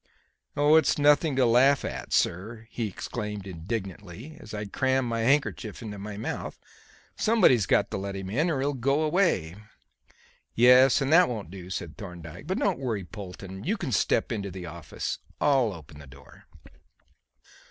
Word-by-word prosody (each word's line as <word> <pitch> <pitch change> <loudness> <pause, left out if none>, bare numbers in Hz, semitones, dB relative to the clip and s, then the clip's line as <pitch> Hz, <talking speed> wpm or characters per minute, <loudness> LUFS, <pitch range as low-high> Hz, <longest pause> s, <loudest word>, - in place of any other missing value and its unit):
"Oh, 145 +2 +5
it's 160 -4 +3
nothing 145 0 +4
to 130 -1 +3
laugh 130 +4 +4
at, - - -6
sir," 110 +6 -1
he 115 -3 -2
exclaimed 105 +1 -5
indignantly 95 - -6
as 110 - -12
I 105 -1 -4
crammed 130 +4 0
my 115 -1 -2
handkerchief 120 -3 0
into 105 -2 -7
my 100 0 -7
mouth. 110 - -5 0.6
"Somebody's 175 - +3
got - - +2
to - - -2
let 100 0 -5
him 95 -1 -6
in, 155 +10 +1
or 140 -5 -1
he'll 145 +1 0
go 140 +4 +1
away." 155 - +1 1.0
"Yes; 125 +3 +6
and 135 +3 +1
that 180 +1 +6
won't 105 -8 -5
do," 90 -2 -9
said 85 -4 -5
Thorndyke. 90 - -9
"But 185 - -1
don't 195 -7 0
worry, 115 -7 -2
Polton. 95 -1 -9
You 210 +6 -1
can 155 -7 -4
step 110 +1 +1
into 100 -3 -3
the 90 -1 -8
office. 85 -2 -5 0.2
I'll 135 -6 +3
open 80 -4 -12
the 70 - -12
door." 70 0 -16
110 Hz, 165 wpm, -27 LUFS, 95-135 Hz, 1.0 s, Yes